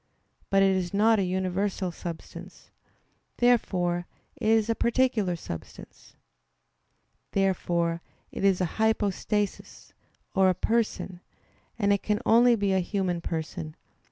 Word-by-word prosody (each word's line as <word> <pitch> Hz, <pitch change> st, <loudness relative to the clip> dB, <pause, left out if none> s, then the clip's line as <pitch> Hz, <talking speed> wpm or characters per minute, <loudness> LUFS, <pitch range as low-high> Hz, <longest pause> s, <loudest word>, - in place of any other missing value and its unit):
But 195 Hz, 0 st, +4 dB
it 195 Hz, -1 st, +4 dB
is 185 Hz, 0 st, -2 dB
not 220 Hz, +1 st, +4 dB
a -, -, +2 dB
universal 185 Hz, +1 st, -1 dB
substance. 170 Hz, -1 st, -9 dB, 0.7 s
Therefore 180 Hz, -8 st, +1 dB, 0.3 s
it 230 Hz, -, -3 dB
is 220 Hz, -1 st, +4 dB
a 230 Hz, -, +2 dB
particular 235 Hz, -6 st, +1 dB
substance. 80 Hz, -, -10 dB, 1.2 s
Therefore 170 Hz, -3 st, 0 dB, 0.3 s
it -, -, -5 dB
is 195 Hz, -2 st, +3 dB
a -, -, +3 dB, 0.2 s
"hypostasis" 210 Hz, -1 st, -1 dB, 0.4 s
or 190 Hz, -2 st, +4 dB
a 185 Hz, -, +1 dB
person; 220 Hz, -5 st, -1 dB, 0.6 s
and 200 Hz, -2 st, +3 dB
it 200 Hz, -, 0 dB
can 210 Hz, 0 st, 0 dB
only 240 Hz, +1 st, +6 dB
be 200 Hz, -3 st, 0 dB
a 190 Hz, -, +3 dB
human 180 Hz, -2 st, -1 dB
person. 160 Hz, -1 st, -5 dB
195 Hz, 125 wpm, -27 LUFS, 175-215 Hz, 1.2 s, only